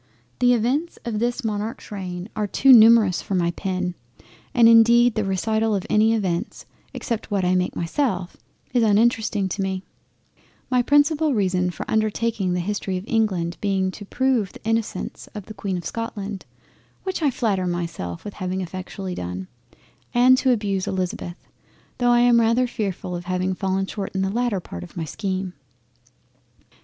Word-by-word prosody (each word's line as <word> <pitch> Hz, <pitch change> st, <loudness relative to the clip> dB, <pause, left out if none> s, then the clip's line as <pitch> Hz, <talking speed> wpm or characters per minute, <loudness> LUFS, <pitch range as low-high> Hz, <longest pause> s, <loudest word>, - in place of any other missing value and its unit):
The 245 Hz, 0 st, +5 dB
Events 265 Hz, +9 st, -1 dB
of 225 Hz, -3 st, -2 dB
this 240 Hz, +3 st, -1 dB
Monarch's 215 Hz, 0 st, -4 dB
reign 180 Hz, -2 st, -5 dB
are 210 Hz, -1 st, -1 dB
too 265 Hz, +6 st, +5 dB
numerous 220 Hz, -7 st, +6 dB
for 195 Hz, -, -3 dB
my 170 Hz, -1 st, +1 dB
pen, 185 Hz, 0 st, -3 dB, 0.6 s
and 235 Hz, -2 st, +5 dB
indeed 230 Hz, +1 st, +6 dB
the 215 Hz, -, -1 dB
recital 220 Hz, +3 st, 0 dB
of 190 Hz, -, -3 dB
any 220 Hz, +1 st, +4 dB
Events 185 Hz, -6 st, -2 dB, 0.3 s
(except 230 Hz, -2 st, -4 dB
what 200 Hz, -3 st, 0 dB
I 180 Hz, -, +2 dB
make 180 Hz, 0 st, 0 dB
myself) 180 Hz, -, -1 dB, 0.4 s
is 245 Hz, -, +3 dB
uninteresting 220 Hz, -2 st, +2 dB
to 195 Hz, -, -3 dB
me; 190 Hz, -1 st, -2 dB, 0.9 s
my 250 Hz, -1 st, +4 dB
principal 290 Hz, +2 st, +3 dB
reason 185 Hz, -3 st, +1 dB
for 175 Hz, -, -6 dB
undertaking 215 Hz, -3 st, 0 dB
the 180 Hz, -, 0 dB
History 195 Hz, 0 st, -2 dB
of 180 Hz, -, -6 dB
England 190 Hz, -7 st, 0 dB
being 190 Hz, -2 st, 0 dB
to 205 Hz, -, -10 dB
Prove 245 Hz, -2 st, 0 dB
the -, -, -14 dB
innocence 225 Hz, -1 st, -2 dB
of 205 Hz, -3 st, -6 dB
the 215 Hz, -, -9 dB
Queen 195 Hz, -3 st, -3 dB
of 175 Hz, -, -7 dB
Scotland, 205 Hz, -1 st, -5 dB, 0.6 s
which 375 Hz, -2 st, -3 dB
I 300 Hz, -, +3 dB
flatter 200 Hz, -7 st, 0 dB
myself 170 Hz, -, -4 dB
with 205 Hz, -, -6 dB
having 185 Hz, 0 st, -3 dB
effectually 185 Hz, +1 st, -6 dB
done, 90 Hz, -, -5 dB, 0.7 s
and 250 Hz, +1 st, +6 dB
to 260 Hz, -, +1 dB
abuse 200 Hz, -5 st, -1 dB
Elizabeth, 180 Hz, -1 st, -4 dB, 0.5 s
tho' 245 Hz, -1 st, +3 dB
I 240 Hz, 0 st, +5 dB
am 240 Hz, -1 st, +5 dB
rather 230 Hz, +3 st, +3 dB
fearful 195 Hz, -6 st, -4 dB
of 175 Hz, 0 st, -6 dB
having 185 Hz, +1 st, -1 dB
fallen 190 Hz, 0 st, -1 dB
short 195 Hz, 0 st, -6 dB
in 190 Hz, -, +1 dB
the 190 Hz, -, -1 dB
latter 235 Hz, -2 st, 0 dB
part 85 Hz, -, -8 dB
of 85 Hz, -, -12 dB
my 165 Hz, -, -2 dB
scheme. 185 Hz, +2 st, -3 dB
205 Hz, 170 wpm, -23 LUFS, 185-230 Hz, 0.9 s, numerous